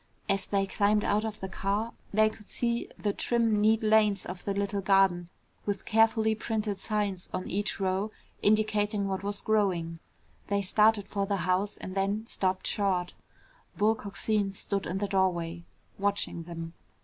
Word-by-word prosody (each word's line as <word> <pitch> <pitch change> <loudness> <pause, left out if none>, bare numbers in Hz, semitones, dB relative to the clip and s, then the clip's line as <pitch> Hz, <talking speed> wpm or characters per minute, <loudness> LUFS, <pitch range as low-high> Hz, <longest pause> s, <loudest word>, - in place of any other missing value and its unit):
As 195 0 0
they 195 -1 +1
climbed 205 +2 +2
out 210 +1 +1
of 215 -1 -4
the 190 - -3
car, 200 +4 -2 0.2
they 215 +1 +4
could 215 -1 -8
see 235 -1 -1
the 205 -1 -1
trim 225 -3 +1
neat 220 +1 +3
lanes 215 -2 +3
of 180 0 -7
the 200 - 0
little 200 0 -1
garden 190 -3 +3 0.4
with 200 -2 -2
carefully 220 0 +3
printed 215 -2 -2
signs 205 -4 -2
on 185 - -3
each 200 +3 -1
row 190 +2 0 0.3
indicating 210 -1 +2
what 190 -1 -2
was 200 0 -3
growing. 180 -6 0 0.5
They 200 0 0
started 210 +1 +3
for 200 -1 -2
the 200 - +1
house 185 +3 +1
and 185 - -7
then 200 +3 0
stopped 185 -4 -1
short. 185 -3 0 0.6
Bull 215 +2 +4
Coxine 205 -1 -1
stood 195 0 -2
in 180 - -2
the 205 +1 -1
doorway, 175 -3 0 0.3
watching 200 -4 -1
them. 165 -1 -7
200 Hz, 160 wpm, -29 LUFS, 190-215 Hz, 0.6 s, they